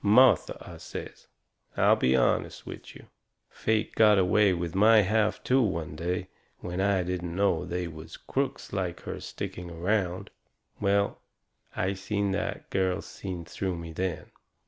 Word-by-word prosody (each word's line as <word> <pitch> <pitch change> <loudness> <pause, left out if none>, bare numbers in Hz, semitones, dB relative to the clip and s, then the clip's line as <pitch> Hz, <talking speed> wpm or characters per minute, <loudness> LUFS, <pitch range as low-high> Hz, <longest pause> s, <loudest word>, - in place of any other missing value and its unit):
"Martha," 110 0 +5
I - - -10
says, - - -8 0.5
"I'll - - +5
be 65 +1 +2
honest 65 - +1
with - - -9
you. - - -13 0.5
Fate 110 0 0
got 105 -2 +6
away 95 +2 +4
with 85 -2 -2
my 110 +3 +6
half 105 +2 +1
too 130 +1 +3
one 85 -9 -1
day 90 +3 -2 0.3
when 90 +2 -4
I 100 -2 +2
didn't 90 -1 -3
know 95 -4 +2
they 90 +1 -3
was 80 0 -9
crooks 135 0 -3
like 90 -3 -2
her - - -6
sticking 90 -1 -6
around." 90 +2 -1 0.5
Well, 100 0 +1 0.5
I 95 +2 0
seen 100 +1 -1
that 100 +2 -3
girl 95 -1 +1
seen 90 -4 -6
through 95 +2 -3
me 85 -1 -7
then. 90 0 -3
95 Hz, 150 wpm, -28 LUFS, 85-105 Hz, 0.5 s, got